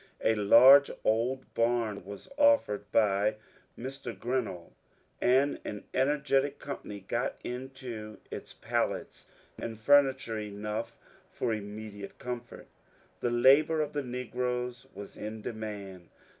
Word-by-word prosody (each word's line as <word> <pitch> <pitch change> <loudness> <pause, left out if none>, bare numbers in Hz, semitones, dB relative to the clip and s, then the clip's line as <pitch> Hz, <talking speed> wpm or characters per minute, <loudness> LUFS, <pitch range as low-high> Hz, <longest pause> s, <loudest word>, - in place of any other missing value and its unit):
A 110 - +4
large 125 +7 +8
old 120 +4 0
bam 115 -4 0
was 100 +2 -10
offered 280 - +3
by 105 0 +3 0.4
Mr. 130 -3 -6
Grinnell, 110 -6 -3 0.5
and 135 +3 +3
an 105 - -6
energetic 140 +1 +1
company 105 -7 -7
got - - -2
into 125 -4 -6
it - - -7
pallets - - -2 0.3
and 115 -1 -5
furniture 135 -3 +3
enough 105 +2 -5 0.3
for 115 - -2
immediate 105 -1 -7
comfort 120 -1 -7 0.5
The 120 - 0
labour 140 +7 +5
of 150 - -3
the 145 - -1
negroes 125 -1 -3
was 100 - -9
in 110 0 -6
demand. 100 -5 -6
120 Hz, 115 wpm, -30 LUFS, 105-130 Hz, 0.5 s, large